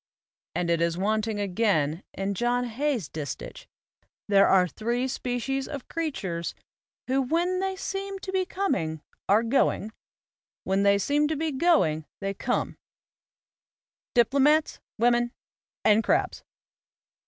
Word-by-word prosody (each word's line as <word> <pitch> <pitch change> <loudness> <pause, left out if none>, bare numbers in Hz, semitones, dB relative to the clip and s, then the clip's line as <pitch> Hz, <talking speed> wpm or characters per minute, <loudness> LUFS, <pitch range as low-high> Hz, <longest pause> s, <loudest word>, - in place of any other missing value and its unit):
And 170 -1 0
it 170 -1 +1
is 170 0 +1
wanting 215 +2 0
again 185 -6 +1
in 195 +1 -2
John 240 +4 +1
Hay's 245 - -1
distich: 150 -4 -7 0.6
There 200 -1 +5
are 185 -1 +5
three 240 +7 -2
species 260 +1 -2
of 280 -4 -7
creatures 190 - -3 0.5
who 265 +1 +1
when 345 +7 0
they 385 0 -1
seem 390 +1 -4
to 380 0 -6
be 380 -1 +1
coming 270 - -2 0.3
are 210 +3 +5
going, 225 -3 +1 0.7
When 190 +1 +1
they 200 0 +5
seem 290 +8 +2
to 315 - -1
be 315 +1 -1
going 260 - +2
they 195 0 -2
come; - - -2 1.4
diplomats, 280 +6 +3 0.2
women 240 +1 +2 0.5
and 215 +1 +5
crabs. - - 0
240 Hz, 125 wpm, -27 LUFS, 195-295 Hz, 1.4 s, There